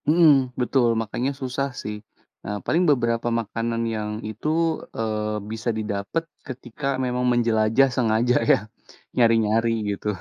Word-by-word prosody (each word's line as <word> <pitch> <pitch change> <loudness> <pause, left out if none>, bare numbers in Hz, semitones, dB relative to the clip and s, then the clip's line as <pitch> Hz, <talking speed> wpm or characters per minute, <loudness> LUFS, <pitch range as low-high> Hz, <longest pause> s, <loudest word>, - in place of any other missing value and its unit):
Mhm, 145 -6 +4
betul 125 -1 +2
makannya 120 +5 -2
susah, 130 +1 -1
sih, 105 - -5 0.5
eee, 105 0 -3
paling 170 +3 +2
beberapa 120 -4 +1
makanan 115 +1 -3
yang 105 -1 -3 0.2
itu, 110 +8 -4 0.5
eee, 110 -1 -1
bisa 110 +1 -3
didapat 105 +8 -2 0.2
ketika 130 +1 -6 0.2
memang 125 0 -1
menjelajah 115 +1 +3
sengaja 120 0 +2 0.2
ya, - - +6 0.6
nyari-nyari 115 -1 +3 0.2
gitu. 100 - -7
115 Hz, 125 wpm, -24 LUFS, 110-130 Hz, 0.6 s, ya